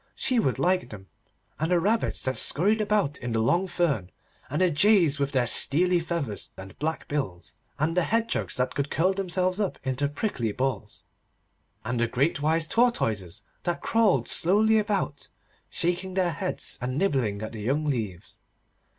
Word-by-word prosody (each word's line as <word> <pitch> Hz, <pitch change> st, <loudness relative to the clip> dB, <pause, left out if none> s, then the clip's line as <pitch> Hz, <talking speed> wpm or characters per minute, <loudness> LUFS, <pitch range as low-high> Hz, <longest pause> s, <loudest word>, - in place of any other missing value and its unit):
She 255 Hz, -2 st, +2 dB
would 135 Hz, -, 0 dB
like 180 Hz, +6 st, +1 dB
them, 100 Hz, -3 st, -10 dB, 0.5 s
and 160 Hz, +2 st, -1 dB
the 180 Hz, -1 st, +3 dB
rabbits 215 Hz, +6 st, 0 dB
that 130 Hz, 0 st, -1 dB
scurried 205 Hz, -, +3 dB
about 205 Hz, -8 st, 0 dB
in 120 Hz, -1 st, -4 dB
the 115 Hz, -, +1 dB
long 170 Hz, +12 st, +2 dB
fern, 155 Hz, -, -1 dB, 0.4 s
and 145 Hz, -, -2 dB
the 185 Hz, -1 st, +3 dB
jays 170 Hz, -3 st, +4 dB
with 140 Hz, 0 st, 0 dB
their 130 Hz, -3 st, +1 dB
steely 175 Hz, +9 st, +3 dB
feathers 165 Hz, -10 st, -4 dB
and 95 Hz, 0 st, -10 dB
black 160 Hz, +2 st, -3 dB
bills, 115 Hz, -13 st, -4 dB, 0.2 s
and 155 Hz, +3 st, 0 dB
the 180 Hz, -, +3 dB
hedgehogs 230 Hz, +6 st, -1 dB
that 125 Hz, 0 st, -1 dB
could 140 Hz, 0 st, -2 dB
curl 185 Hz, +4 st, +1 dB
themselves 185 Hz, 0 st, 0 dB
up 200 Hz, -3 st, -1 dB
into 135 Hz, +1 st, -1 dB
prickly 145 Hz, -, -2 dB
balls, 130 Hz, -4 st, -3 dB, 0.8 s
and 120 Hz, +1 st, -2 dB
the 120 Hz, -, +2 dB
great 140 Hz, +6 st, 0 dB
wise 160 Hz, +2 st, +1 dB
tortoises 115 Hz, -, 0 dB, 0.2 s
that 175 Hz, -1 st, -3 dB
crawled 205 Hz, -, +2 dB
slowly 215 Hz, +5 st, +4 dB
about, 200 Hz, -9 st, -2 dB, 0.4 s
shaking 180 Hz, +2 st, -2 dB
their 185 Hz, -2 st, +1 dB
heads 155 Hz, -, -4 dB
and 130 Hz, +2 st, -3 dB
nibbling 125 Hz, -, 0 dB
at 110 Hz, -, -5 dB
the 110 Hz, -, -7 dB
young 140 Hz, +8 st, 0 dB
leaves. 110 Hz, -, -4 dB
155 Hz, 165 wpm, -26 LUFS, 125-185 Hz, 0.8 s, jays